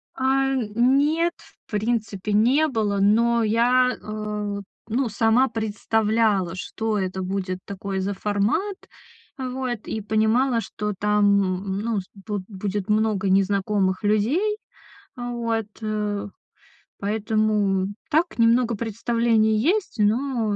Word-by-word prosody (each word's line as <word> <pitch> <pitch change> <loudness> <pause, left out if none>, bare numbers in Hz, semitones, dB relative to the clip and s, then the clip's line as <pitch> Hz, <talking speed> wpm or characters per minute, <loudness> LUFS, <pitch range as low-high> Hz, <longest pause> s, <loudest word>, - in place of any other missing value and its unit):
А, 270 +1 +1
нет, 270 +9 +2 0.3
в - - -25
принципе, 210 -2 -1
не 255 +9 +4
было, 215 -7 0
но 230 +3 +3
я, 245 +3 +3
э, 210 -1 -4 0.3
ну, 240 +2 0
сама 225 +5 +3
представляла, 220 -3 0
что 220 +3 -3
это 190 -1 -2
будет 185 -1 -3
такой 195 0 -4
за 195 +2 -1
формат, 210 - 0 0.6
вот, 255 -3 -4
и 220 - -3
понимала, 220 +4 +2
что 210 -1 -4
там, 200 -2 +1
ну 225 -2 -1
с - - -15
буд 205 0 -5
будет 200 0 -4
много 210 -2 +1
незнакомых 195 0 +1
людей. 260 - +1 0.6
А, 245 -1 -5
вот, 230 -2 -2
э. 210 -1 -2 0.7
Поэтому 210 -2 +1 0.2
так 320 -2 +1
немного 230 +1 +3
представление 225 0 +1
есть, 385 - 0
но, 225 0 +1
215 Hz, 115 wpm, -23 LUFS, 205-235 Hz, 0.7 s, не